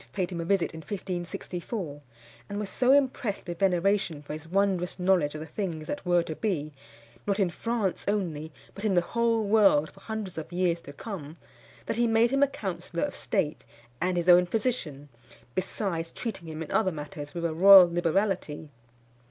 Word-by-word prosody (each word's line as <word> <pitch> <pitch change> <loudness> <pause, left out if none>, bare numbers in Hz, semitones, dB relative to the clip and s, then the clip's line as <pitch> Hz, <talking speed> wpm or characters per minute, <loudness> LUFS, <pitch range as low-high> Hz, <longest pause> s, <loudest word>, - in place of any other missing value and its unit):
paid 185 -2 -2
him 170 -2 -3
a - - -4
visit 195 -2 +1
in 160 - -7
1564; 175 -1 -5 0.5
and 205 - -4
was 205 -1 -4
so 255 0 +3
impressed 265 -6 +1
with 175 -1 -5
veneration 185 -4 +1
for 145 - -6
his 155 +1 -8
wondrous 185 -1 0
knowledge 180 -5 +2
of 155 - -5
the - - -5
things 160 -2 -4
that 290 - -4
were 175 -1 +3
to 155 - -5
be, 155 -8 -2 0.5
not 200 0 +1
in 190 -3 +2
France 225 -2 -2
only, 165 -7 -1 0.2
but 200 - -9
in 210 -3 +2
the 175 - +5
whole 230 -1 +2
world 200 -8 +4
for 195 - -18
hundreds 210 -5 -5
of 160 - -8
years 175 -1 0
to 140 - -10
come, 160 -2 -7 0.5
that - - -2
he 240 0 +3
made 225 +1 +3
him 275 0 +2
a 280 - +6
counsellor 175 -8 -4
of - - -2
state 150 -1 -1 0.4
and 180 0 +1
his 175 0 -1
own 180 0 +7
physician, 175 - -2 0.5
besides 175 -3 -2
treating 205 -7 -5
him 160 0 -5
in 155 - -10
other 205 -4 +2
matters 150 -1 -7
with 170 0 -2
a 165 - 0
royal 190 +2 +9
liberality. 175 -2 -1
180 Hz, 185 wpm, -28 LUFS, 165-205 Hz, 0.5 s, royal